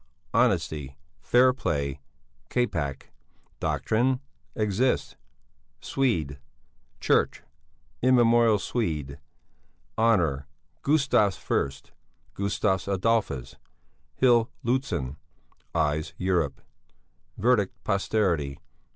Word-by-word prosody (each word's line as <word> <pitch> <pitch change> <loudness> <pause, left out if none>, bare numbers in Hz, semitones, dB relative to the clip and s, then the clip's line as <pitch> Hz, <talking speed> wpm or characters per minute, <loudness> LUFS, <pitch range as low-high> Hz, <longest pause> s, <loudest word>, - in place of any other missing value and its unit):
Honesty. 70 -3 +1 0.2
Fairplay. 80 - +2 0.5
Capac. 80 - -2 0.5
Doctrine. 125 +4 +1 0.4
Exist. 110 +4 0 0.6
Swed. 80 - -1 0.6
Chch. - - +2 0.6
Immemorial 120 -3 +5
Swed. 75 - -3 0.8
Honour. 85 -12 +2 0.3
Gustavus 135 -9 +2
I. 70 -1 -1 0.4
Gustavus 95 -2 0
Adolphus. 95 - 0 0.6
Hill 120 -3 +4 0.2
Lûtzen. 120 - -1 0.6
Eyes 75 +1 0
Europe. 85 -7 0 0.8
Verdict 105 -4 +1
posterity. 95 -8 0
100 Hz, 65 wpm, -26 LUFS, 75-120 Hz, 0.8 s, Immemorial